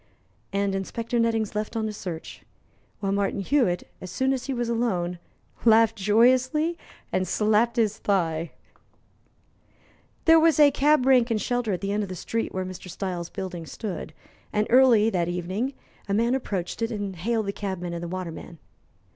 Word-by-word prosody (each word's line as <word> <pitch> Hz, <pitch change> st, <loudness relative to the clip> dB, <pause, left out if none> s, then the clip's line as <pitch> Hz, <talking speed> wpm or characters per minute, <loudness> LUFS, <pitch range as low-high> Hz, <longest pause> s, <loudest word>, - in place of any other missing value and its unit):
And 200 Hz, 0 st, 0 dB
Inspector 230 Hz, +5 st, -2 dB
Nettings 225 Hz, -2 st, +1 dB
left 210 Hz, +1 st, -3 dB
on 220 Hz, -1 st, -1 dB
his 215 Hz, -1 st, -4 dB
search; 170 Hz, -5 st, -7 dB, 0.6 s
while 195 Hz, -1 st, 0 dB
Martin 200 Hz, 0 st, 0 dB
Hewitt, 195 Hz, -6 st, +1 dB
as 185 Hz, -, -7 dB
soon 265 Hz, +8 st, +1 dB
as 260 Hz, 0 st, -4 dB
he -, -, -2 dB
was 240 Hz, -2 st, -1 dB
alone, 185 Hz, -7 st, -1 dB, 0.4 s
laughed 225 Hz, -1 st, +5 dB
joyously 255 Hz, -, +3 dB, 0.4 s
and 185 Hz, -, 0 dB
slapped 215 Hz, +4 st, +2 dB
his 220 Hz, -2 st, +1 dB
thigh. 165 Hz, -5 st, 0 dB, 1.8 s
There 325 Hz, 0 st, +7 dB
was 320 Hz, -1 st, +4 dB
a 290 Hz, -1 st, +7 dB
cab 290 Hz, -1 st, +3 dB
rank 255 Hz, -2 st, +5 dB
and 225 Hz, -2 st, +1 dB
shelter 245 Hz, -1 st, -1 dB
at 185 Hz, -, -2 dB
the 200 Hz, 0 st, -2 dB
end 210 Hz, +1 st, 0 dB
of 200 Hz, -, -4 dB
the 185 Hz, -, -5 dB
street 225 Hz, +6 st, -3 dB
where 185 Hz, 0 st, -3 dB
Mr. 185 Hz, 0 st, -8 dB
Styles' 180 Hz, -2 st, -4 dB
building 180 Hz, -4 st, -6 dB
stood, 200 Hz, +1 st, -5 dB, 0.4 s
and 210 Hz, 0 st, +1 dB
early 240 Hz, -4 st, +6 dB
that 175 Hz, -4 st, 0 dB
evening 185 Hz, +9 st, -2 dB, 0.3 s
a 200 Hz, -, +1 dB
man 235 Hz, +3 st, +2 dB
approached 205 Hz, -8 st, -3 dB
it 225 Hz, -, 0 dB
and 205 Hz, -4 st, -4 dB
hailed 220 Hz, +5 st, -1 dB
the 200 Hz, -, -2 dB
cabmen 185 Hz, -4 st, -4 dB
and 170 Hz, -, -4 dB
the 175 Hz, -, -4 dB
waterman. 170 Hz, -2 st, -6 dB
210 Hz, 170 wpm, -25 LUFS, 185-235 Hz, 1.8 s, There